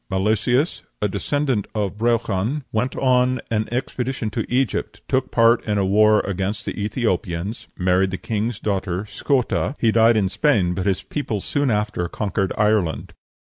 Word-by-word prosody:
Milesius, 110 - +1 0.2
a 105 - +1
descendant 125 +3 -1
of 100 -2 -1
Breogan, 115 +3 0
went 120 +4 -1
on 130 -1 +2
an 110 -1 0
expedition 125 -2 -2
to 115 0 -4
Egypt, 115 -4 -1
took 130 -1 0
part 115 0 +4
in 105 -1 0
a 100 - +2
war 105 +2 +4
against 100 +2 -3
the - - -4
Ethiopians, 100 -3 -2
married 95 +1 +2
the 95 - -3
king's 110 +4 -2
daughter, 95 -2 -2
Scota: 130 +6 0
he 115 - +2
died 115 0 +5
in 100 -3 +2
Spain, 95 - +2
but 95 +2 -2
his 95 -2 0
people 125 -8 -3
soon 145 +7 -1
after 105 -5 -1
conquered 100 -2 -1
Ireland. 105 -6 +1
110 Hz, 155 wpm, -22 LUFS, 95-125 Hz, 0.2 s, died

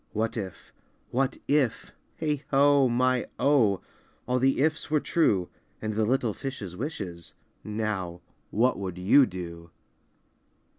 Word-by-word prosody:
What 110 +1 -1
if, 95 -7 -7 0.4
what 135 +2 0
if, 140 -5 +1 0.3
heigho! 145 -2 +3
my 125 +1 +2
oh! 115 -10 +3 0.5
All 125 0 +1
the 135 +1 +2
"ifs" 155 +3 +1
were 150 0 +3
true, 100 - +1 0.3
And 110 0 -3
the 110 +1 +1
little 120 -2 +1
fishes 110 -10 -6
wishes, 95 - -6 0.3
Now, 105 -5 -3 0.3
what 120 +2 +2
would 95 -3 -4
you 110 +9 +5
do? 85 -2 -8
115 Hz, 120 wpm, -27 LUFS, 95-135 Hz, 0.5 s, you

